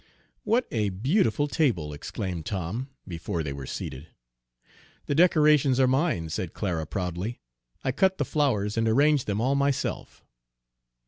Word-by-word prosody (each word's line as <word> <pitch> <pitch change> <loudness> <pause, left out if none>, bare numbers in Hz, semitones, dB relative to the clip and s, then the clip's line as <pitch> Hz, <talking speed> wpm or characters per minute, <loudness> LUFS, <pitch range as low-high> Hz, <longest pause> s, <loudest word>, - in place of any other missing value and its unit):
"What 240 +3 +2
a 105 -3 0
beautiful 130 - +1
table!" 110 - 0
exclaimed 85 +3 -5
Tom, 100 +7 -3 0.2
before 85 0 -3
they 70 -2 -4
were 70 -2 -7
seated. 65 +4 -6 1.0
"The - - -1
decorations 150 -5 +4
are 130 - +6
mine," 130 - +1
said 90 +2 -4
Clara 85 -6 -2
proudly. 90 +7 -3 0.4
"I 130 - +1
cut 190 +7 +2
the - - 0
flowers 115 -9 0
and 115 0 +2
arranged 140 +4 +3
them 105 0 -1
all 130 +4 +2
myself." 140 -1 -1
115 Hz, 140 wpm, -27 LUFS, 90-145 Hz, 1.0 s, are